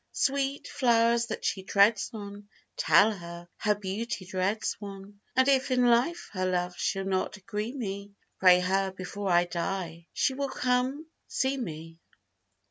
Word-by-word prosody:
Sweet 275 0 0
flowers, 235 -1 +3
that 215 - -5
she 190 - 0
treads 200 +2 +3
on, 205 -1 -9 0.3
Tell 170 +7 +5
her, 170 -3 -8
her 210 0 +1
beauty 205 +1 -4
dreads 190 +3 -1
one; 200 0 -10
And 260 +1 +4
if 270 -1 +3
in 250 -1 +3
life 245 +9 +2
her 185 -1 -1
love 180 0 -1
she'll 195 +1 -1
not 190 +2 -1
agree 210 +3 -4
me, 200 -4 -5 0.2
Pray 180 -1 +7
her 190 +1 +1
before 190 +2 -5
I 175 0 +4
die, 170 -1 -4
she 265 - +1
will 275 +1 -2
come 255 +5 0 0.2
see 265 +1 0
me. 165 - -7
200 Hz, 150 wpm, -28 LUFS, 185-235 Hz, 0.3 s, Pray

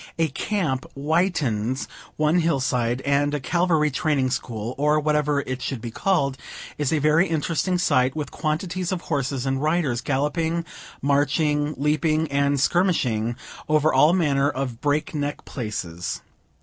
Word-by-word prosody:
A 165 -1 +2
camp 145 -4 -2
whitens 140 - 0 0.3
one 155 +3 +3
hill 165 -4 +1
side, 125 -1 0
and 140 +2 +1
a - - -1
cavalry 160 0 +1
training 135 -2 +1
school, 115 -1 -3
or 150 +1 +3
whatever 150 -1 +1
it 130 -1 -5
should 130 0 -3
be 115 0 -6
called, 140 -5 0 0.4
is 145 -3 0
a 160 - +2
very 155 +5 +3
interesting 165 +3 0
sight, 130 -7 +2
with 150 -3 -4
quantities 175 +4 -2
of 185 -2 -2
horses 135 -3 -2
and 135 0 0
riders 150 -6 +1
galloping, 160 +5 -1 0.4
marching, 145 +1 +1
leaping, 155 +2 +1
and 140 0 +2
skirmishing, 130 - +1 0.3
over 155 0 +3
all 150 +5 +6
manner 145 -6 +2
of 130 -4 -4
break 150 +1 0
neck 145 -1 -3
places. 90 -8 -4
145 Hz, 145 wpm, -24 LUFS, 130-160 Hz, 0.4 s, all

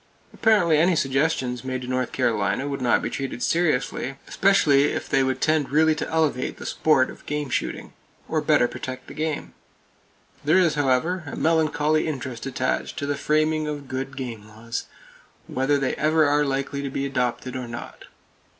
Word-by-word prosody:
Apparently 180 -9 +3
any 175 +2 +4
suggestions 135 -3 0
made 130 -1 -3
to - - -7
North 130 -1 -1
Carolina 115 +1 0
would 140 -2 -4
not 125 -1 +2
be - - -1
treated 135 -3 -4
seriously, 145 -5 0
especially 150 -8 +4
if - - -2
they 135 - +2
would 130 0 0
tend 155 -2 +1
really 155 +2 +4
to 155 - -4
elevate 155 -6 0
the - - -9
sport 150 -5 +2
of - - -14
game 150 -2 -3
shooting, - - -3 0.3
or 155 - 0
better 150 -4 +3
protect 130 +1 -7
the - - -10
game. 155 -1 -3 0.9
There 155 +5 +4
is, 175 -4 +4
however, 150 +5 +1
a - - -5
melancholy 155 -1 +2
interest 130 -4 -4
attached 130 +2 -2
to 145 - -2
the 145 0 -1
framing 155 +2 +1
of 145 -2 -5
good 130 +1 -5
game 115 -5 -6
laws, 115 +2 -6 0.6
whether 135 +3 +1
they 135 -2 0
ever 155 +1 +3
are 145 +1 +3
likely 140 +1 -2
to 140 - -3
be 135 +1 -2
adopted 130 -1 -2
or 125 -1 -4
not. 120 0 -8
140 Hz, 175 wpm, -24 LUFS, 130-155 Hz, 0.9 s, any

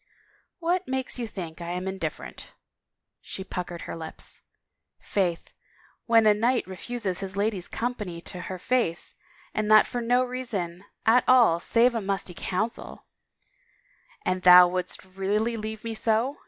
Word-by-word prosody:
" - - -38
What 355 +1 0
makes 260 -1 -2
you 235 - -2
think 175 -5 -7
I 170 - -5
am 180 +1 -4
indifferent? 190 0 -6 0.3
" - - -61 0.3
She 190 - -6
puckered 175 -2 -5
her - - -6
lips. 160 -1 -7 0.3
" - - -58
Faith, 180 -4 0 0.5
when 230 -1 +5
a 210 - +7
knight 235 +4 +1
refuses 190 0 -2
his 195 0 -3
lady's 200 -3 -1
company 210 -8 -4
to 180 +1 -7
her 185 - -4
face 180 -4 0 0.4
and 215 0 -1
that 215 0 +8
for 245 - -4
jio 245 +2 +2
reason 200 -8 -4 0.2
at 240 +3 +5
all 235 -10 +6
save 235 +7 +3
a 230 - -1
musty 195 -2 -2
Council 215 +8 -3 0.4
— - - -38
" - - -31
"And 185 0 0
thou 180 0 +9
wouldst 185 +1 -3
really 200 +5 -1
leave 220 -1 -6
me 230 -1 -3
so?" 225 +5 0
210 Hz, 165 wpm, -26 LUFS, 185-240 Hz, 0.5 s, thou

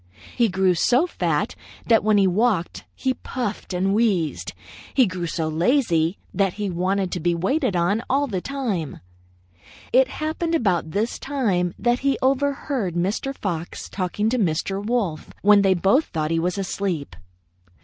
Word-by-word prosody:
He 235 -2 +3
grew 190 0 +2
so 245 - +3
fat 360 - -1 0.3
that 225 -3 +4
when 215 0 +3
he 195 - +4
walked, 190 -1 0
he 260 -1 0
puffed 245 -6 -5
and 190 +2 +1
wheezed. 200 -8 0 0.4
He 260 - +6
grew 185 -3 -3
so 160 0 -2
lazy 170 - +1 0.2
that 195 -2 +1
he 205 -2 -3
wanted 185 +2 0
to 180 - -2
be 170 +1 +1
waited 235 - 0
on 175 +6 +1
all 280 +2 +2
the 195 -9 -3
time. 225 - -3 0.9
"It 260 +1 +6
happened 320 +3 -2
about 185 - +1
this 210 +7 -2
time 200 -11 0
that 240 +1 +1
he 275 0 +1
overheard 270 - 0
Mr. 205 +10 -1
Fox 170 -4 -4
talking 200 +3 -2
to 250 +2 0
Mr. 195 +2 -1
Wolf 205 -9 -1
when 205 0 +6
they 190 -1 +4
both 195 - +3
thought 155 -2 -3
him 165 0 +1
asleep. 180 - -2
200 Hz, 155 wpm, -23 LUFS, 175-245 Hz, 0.9 s, He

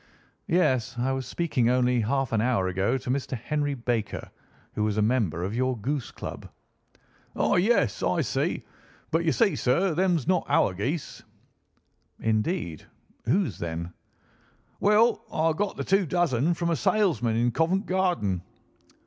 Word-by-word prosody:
"Yes. 130 - +1
I 125 +2 0
was 135 -1 -3
speaking 140 -9 0
only 125 0 +2
half 135 +3 0
an 110 -2 +2
hour 115 -6 +1
ago 95 +8 0
to 125 - -7
Mr. 130 -1 -2
Henry 145 +4 -2
Baker, 115 -4 -3 0.4
who 105 - -1
was 105 -1 0
a - - +3
member 105 -8 +1
of 95 +3 -3
your 130 0 0
goose 130 +3 -3
club." - - -8 0.9
"Ah! - - +2
yes, 210 +7 +2
I - - +1
see. - - -1 0.5
But 165 +1 +1
you 160 - +3
see, 200 -4 +2
sir, 170 +9 +1
them's 175 -4 +1
not 180 -1 +1
our 95 - +3
geese." 130 - -3 1.0
"Indeed! 110 - -1 0.4
Whose, 140 - +1
then?" 85 +1 -4 0.9
"Well, 215 +3 +3
I 160 +1 +1
got 200 +5 -2
the - - -2
two 195 -2 +2
dozen 170 -2 +1
from 170 +1 -1
a - - +2
salesman 155 - +1
in 120 +1 +2
Covent 175 - +1
Garden." 175 - 0
130 Hz, 150 wpm, -26 LUFS, 115-170 Hz, 1.0 s, a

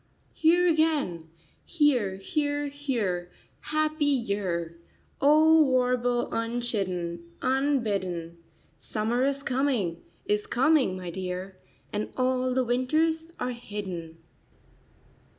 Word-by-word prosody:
"Here 340 +3 +4
again, 300 - +1 0.3
here, 260 - +2
here, 290 - -1
here, 225 -12 -2 0.3
happy 310 0 0
year!" 200 - -1 0.4
O 310 +3 +6
warble 250 -3 +2
unchidden, 195 -8 -2
unbidden! 205 - -1 0.4
Summer 225 - 0
is 275 0 0
coming, 245 -12 0 0.2
is 210 0 0
coming, 260 -6 +3
my 180 -2 -6
dear, 185 +1 -5 0.4
And 210 +1 -2
all 255 0 +1
the 260 - +3
winters 315 +7 +1
are 250 0 -1
hidden. 190 -8 -6
245 Hz, 95 wpm, -27 LUFS, 185-285 Hz, 0.4 s, O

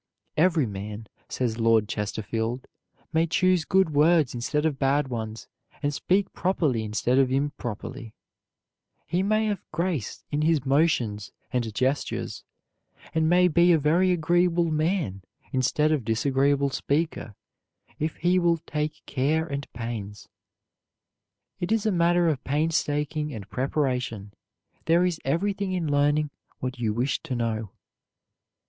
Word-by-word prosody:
Every 160 -2 +3
man, 105 +1 -6 0.2
says 120 -3 -2
Lord 115 -2 +3
Chesterfield, 110 +4 -3 0.5
may 165 +1 +3
choose 185 -1 +2
good 190 -4 +3
words 150 -1 +4
instead 150 +5 -1
of 150 -4 0
bad 140 0 +2
ones 110 -2 -5 0.4
and 145 0 +1
speak 190 +7 +1
properly 155 -11 0
instead 110 +4 +1
of 130 -2 +3
improperly; 130 -3 -3 0.9
he 175 +3 0
may 215 +2 +2
have 205 -4 -1
grace 165 - -2
in 145 - 0
his 155 -3 +2
motions 130 -8 +1 0.2
and 120 -3 0
gestures, 130 +4 -1 0.7
and 160 0 +2
may 180 +1 +5
be 175 +1 +4
a - - +5
very 165 +5 +3
agreeable 175 0 +2 0.8
instead 140 +4 +2
of 150 -5 +1
disagreeable 135 +5 +1
speaker 145 -7 -2 0.6
if 155 +1 -1
he 180 +1 +2
will 170 -1 +3
take 150 0 -3
care 150 +4 0
and 140 -3 -5
pains. 115 -4 -6 1.3
It 175 +3 -3
is 225 -1 +1
a 215 - +3
matter 175 -1 +3
of 150 -5 0
painstaking 150 -1 -1
and 100 -3 -8
preparation. 125 -7 -2 0.5
There 170 +2 +4
is 175 -3 -1
everything 195 +6 -1
in 165 -5 -1
learning 145 +1 +2 0.3
what 125 -1 -5
you 110 -3 0
wish 120 +5 -1
to 130 - -4
know. 115 -3 -2
145 Hz, 130 wpm, -26 LUFS, 120-170 Hz, 1.3 s, may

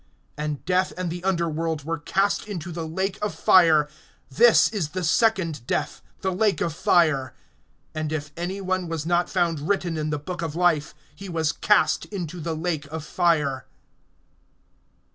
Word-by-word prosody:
(14)And 150 -1 -4
death 185 +1 +1
and 180 -2 -2
the 175 +1 -6
underworld 165 -4 -1
were 165 +2 -3
cast 195 +7 0
into 175 -4 -5
the 165 -1 -5
lake 190 +4 -2
of 210 - -2
fire. 160 -5 +5 0.4
This 235 - +6
is 195 -9 -2
the 185 +2 -4
second 170 - +1
death, - - -2 0.2
the 190 -1 -1
lake 205 +1 +1
of 165 - -1
fire. 155 -6 +2 0.6
(15)And 155 -1 -3
if 150 -2 -4
any 185 +3 -4
one 185 -1 -1
was 165 -2 -4
not 175 +1 +1
found 175 -5 0
written 180 -5 0
in 155 0 -2
the 150 - -1
book 170 +4 -6
of 160 -2 -4
life, 165 -5 +1 0.2
he 195 0 -9
was 160 -3 0
cast 155 +1 +2
into 180 -4 -6
the 165 0 -3
lake 160 -3 -2
of 155 +1 -6
fire. 150 -7 +1
170 Hz, 165 wpm, -24 LUFS, 155-185 Hz, 0.6 s, This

